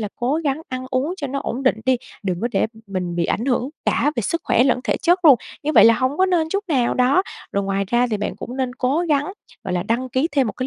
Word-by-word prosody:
là 210 - -3
cố 250 +4 0
gắng 280 +1 0
ăn 255 0 -5
uống 275 +7 -1
cho 290 - -4
nó 275 +1 -3
ổn 255 +4 -4
định 255 -4 +2
đi, 260 - +4 0.3
đừng 185 -3 -2
có 235 - 0
để - - +2 0.2
mình 180 -3 -4
bị 170 - +1
ảnh 225 - -1
hưởng 255 -1 0 0.2
cả 290 - +2
về - - +1
sức 335 - -2
khỏe 245 - +3
lẫn 255 -2 +2
thể - - 0
chất 350 +1 +2
luôn, 280 -5 +8 0.3
như 305 - -1
vậy - - +7
là 230 - +7
hông 255 +5 -1
có 375 - +4
nên 345 -4 +1
chút 400 +5 -2
nào 255 -7 +1
đó. 255 +8 +3 0.3
Rồi 200 0 0
ngoài 195 0 -1
ra 240 +2 +2
thì 215 - 0
bạn 210 - -4
cũng 245 - -7
nên 255 -2 -2
cố 270 +4 0
gắng, 290 +4 +1 0.3
gọi 185 - -3
là, 175 - 0
đăng 235 +6 -1
ký 260 +5 0
thêm 275 -3 +2
một 215 - -3
cái 255 - -4
255 Hz, 280 wpm, -21 LUFS, 230-290 Hz, 0.3 s, luôn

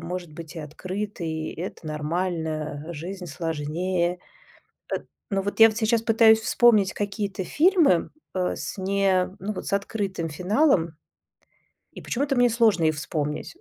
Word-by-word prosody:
может 175 -1 -5
быть 165 +1 -9
и - - -4
открытый, 165 0 -4
это 170 -1 -7
нормально, 155 -1 -2
жизнь 180 +4 -6
сложнее. 170 +3 -2 0.7
Эт - - -3 0.2
но 195 -1 0
вот 205 +3 -4
я 225 - +10
вот 215 - -5
сейчас 225 0 +2
пытаюсь 225 -1 +5
вспомнить 220 -5 +4
какие-то 200 -2 -3
фильмы, 315 - +3 0.2
э, 180 -1 0
с - - -5
не 190 -1 +1
ну 205 +3 -3
вот - - -7
с - - -4
открытым 200 -4 -2
финалом. 180 - +2 1.0
И - - -9
почему-то 275 +2 -1
мне 245 0 +4
сложно 220 -7 +3
их 155 -1 +3
вспомнить. 150 - -3
185 Hz, 140 wpm, -25 LUFS, 165-210 Hz, 1.0 s, я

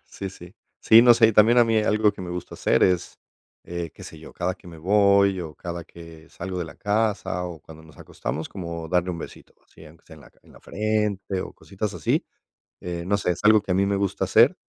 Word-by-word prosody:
Sí, 95 - -7
sí. 90 0 -14 0.3
Sí, 115 0 +7
no 120 -1 +7
sé, 115 -1 +5
y - - 0
también 110 +3 +5
a 120 - +7
mí 115 -1 +2
algo 105 0 +2
que - - -12
me 90 -1 -6
gusta 90 0 -6
hacer - - +1
es, 90 -2 +1 0.5
eh, 85 -2 -5
qué - - -13
sé 80 - -11
yo, 80 - -13
cada 90 +1 -2
que - - -20
me 85 -2 -11
voy 100 +1 +3
o 80 -3 -7
cada 85 +2 -7
que 85 -1 -14
salgo 90 +1 -6
de 90 - -2
la 80 -2 -11
casa 105 -3 -1
o 85 -3 -7
cuando 80 +2 -14
nos 80 - -18
acostamos, 80 +2 -5
como 85 -3 -7
darle 90 +1 0
un 85 - -5
besito - - -11
así, 80 - -17
aunque 80 +2 -17
sea 80 - -14
en - - -16
la - - -17
ca - - -33
en - - -20
la - - -17
frente 105 -3 -2
o - - -7
cositas 100 +1 -6
así, 80 -4 0 0.6
eh, 85 -1 -5
no 100 +2 +1
sé, 90 - 0
es 90 - -6
algo 110 0 +6
que 95 - -5
a - - +3
mí 100 +1 +2
me 100 0 0
gusta 100 -1 -1
hacer 115 - +4
95 Hz, 250 wpm, -24 LUFS, 85-105 Hz, 0.6 s, Sí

